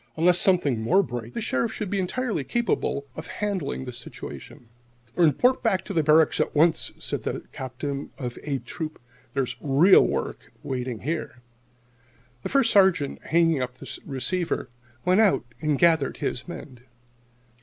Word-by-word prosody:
Unless 175 +2 +5
something 170 - +3
more 185 - +3
breaks, 120 -6 -6
the - - -2
Sheriff 225 +1 0
should 210 -4 -4
be 200 - 0
entirely 210 - -1
capable 220 - -1
of - - -7
handling 190 -10 -3
the 125 - -6
situation." 120 0 -9 0.5
"Then 175 - +5
report 250 - +3
back 190 -6 +1
to 165 -5 0
Barracks 155 +1 +4
at - - 0
once," 160 +2 +3
said - - -3
the - - -2
voice - - -4
of - - -10
the - - -28
Captain 135 +2 -5
of 125 -2 -5
"A" 140 -2 -2
Troop. 155 +3 -6 0.4
"There's 135 -3 -1
real 150 +7 +6
work - - -3
waiting 125 -4 -4
here." 145 -4 -4 1.0
The - - -4
First 275 -3 +3
Sergeant, 190 -8 +3
hanging 165 -3 +3
up 125 0 -3
the - - -8
receiver, 150 +7 -2 0.4
went 185 +4 +4
out 185 - +3 0.2
and 155 -2 +1
gathered 160 -4 +3
his 125 - -3
men. 135 -7 -9
155 Hz, 165 wpm, -25 LUFS, 130-185 Hz, 1.0 s, real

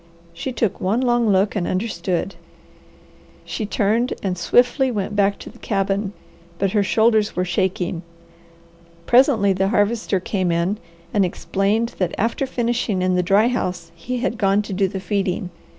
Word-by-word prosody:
She 255 +10 -4
took 225 -5 -1
one 200 +6 +1
long 240 -3 +2
look 195 +1 +2
and 180 -4 -1
understood. 185 -2 -2 1.1
She 215 - -4
turned 220 +4 +1
and 190 -2 -1
swiftly 245 +8 +3
went 205 -3 -3
back 200 0 +2
to - - -10
the - - -18
cabin, 195 0 -1 0.4
but 195 0 0
her 210 - +2
shoulders 220 +1 +2
were 180 - 0
shaking. 180 -1 -1 1.0
Presently 240 -6 +4
the 190 +1 +1
Harvester 205 -1 +1
came 185 -1 -1
in 170 +5 0 0.3
and 205 - +3
explained 195 +6 0
that 185 - -1
after 230 +6 0
finishing 235 -6 -1
in 185 0 +2
the 180 - +2
dry 195 +5 +3
house 180 -9 -3
he 225 +10 -5
had 235 -1 -2
gone 200 +1 +2
to 205 - -6
do 195 +1 +2
the 190 +1 -5
feeding. 190 -1 -2
200 Hz, 160 wpm, -21 LUFS, 185-225 Hz, 1.1 s, Presently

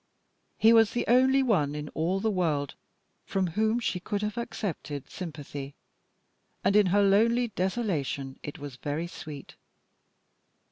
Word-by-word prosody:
He 225 +1 +6
was 225 -1 +5
the 240 - -1
only 260 +3 +5
one 155 - +1
in 150 0 -5
all 175 +5 -1
the 220 +2 0
world 155 -7 0 0.5
from 190 -1 -1
whom 220 +7 +1
she 200 -6 -1
could 205 +3 -3
have 210 +1 -2
accepted 175 - -5
sympathy, 145 -5 -7 0.9
and 195 +2 +2
in 210 -2 +6
her 200 +3 +4
lonely 230 +5 +3
desolation 180 - -2
it 145 - -7
was 145 -3 -8
very 150 +5 -3
sweet. 150 -4 -9
190 Hz, 140 wpm, -28 LUFS, 150-220 Hz, 0.9 s, He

